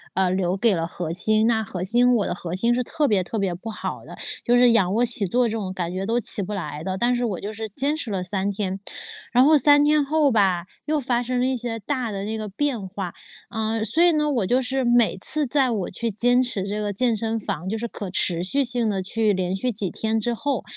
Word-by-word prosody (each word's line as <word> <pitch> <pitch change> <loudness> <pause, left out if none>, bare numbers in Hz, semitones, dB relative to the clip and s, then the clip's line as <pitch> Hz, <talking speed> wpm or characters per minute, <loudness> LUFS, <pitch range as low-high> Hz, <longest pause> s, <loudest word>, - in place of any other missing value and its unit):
呃， 190 0 +2
留 185 0 0
给 215 0 +3
了 165 -1 -2
核 170 -1 -6
心。 215 +5 +2
那 225 -2 +1
核 185 -3 -5
心 240 +5 +3
我 210 - +1
的 - - -2
核 175 0 -5
心 235 +6 +3
是 250 - 0
特 300 +3 -1
别 200 -6 +2
特 220 - -5
别 195 -3 -1
不 190 +6 -8
好 215 - -6
的， - - -11 0.3
就 240 - +3
是 245 0 +5
仰 195 -5 +2
卧 235 +3 +2
起 225 -3 +5
坐 245 +6 +2
这 - - -3
种 205 -4 -4
感 175 -2 -3
觉 190 +1 -3
都 230 +3 0
起 215 - +2
不 200 +2 -4
来 155 -6 -5
的， 190 +1 -3
但 240 +4 +1
是 245 0 -1
我 200 -6 -3
就 205 - -5
是 220 +1 -5
坚 275 +8 0
持 310 -7 -5
了 190 -2 -2
3 190 +2 -1
天。 195 -1 -3 0.5
然 250 +2 +5
后 305 +1 +6
3 290 0 +5
天 300 0 +3
后 300 -1 +2
吧， 190 -6 +2 0.2
又 310 0 0
发 245 -3 0
生 250 +1 -2
了 250 - +1
一 260 0 0
些 235 -2 -3
大 250 +1 -3
的 195 -1 -4
那 220 +1 -3
个 215 -1 -5
变 235 -2 -2
化。 185 -2 -6 0.4
嗯， 220 0 -1
所 270 - +2
以 350 - +6
呢， 300 -1 +1
我 235 -8 0
就 250 +4 +2
是 265 +1 -1
每 240 -4 +3
次 300 +10 +1
在 265 0 +2
我 205 -5 -2
去 230 +4 -3
坚 245 +5 +3
持 240 -6 +1
这 205 +2 -3
个 205 -1 -2
健 235 +3 +2
身 225 +1 -2
房， 190 -4 -4
就 220 - -2
是 235 +2 -3
可 205 -3 -7
持 175 -2 +1
续 275 +10 +1
性 240 -3 +1
地 195 -2 -1
去 215 +2 +1
连 185 -1 -2
续 250 +6 -1
几 200 -4 -1
天 220 0 -1
之 240 +2 -1
后， 275 -1 -2
220 Hz, 275 characters per minute, -23 LUFS, 195-245 Hz, 0.5 s, 后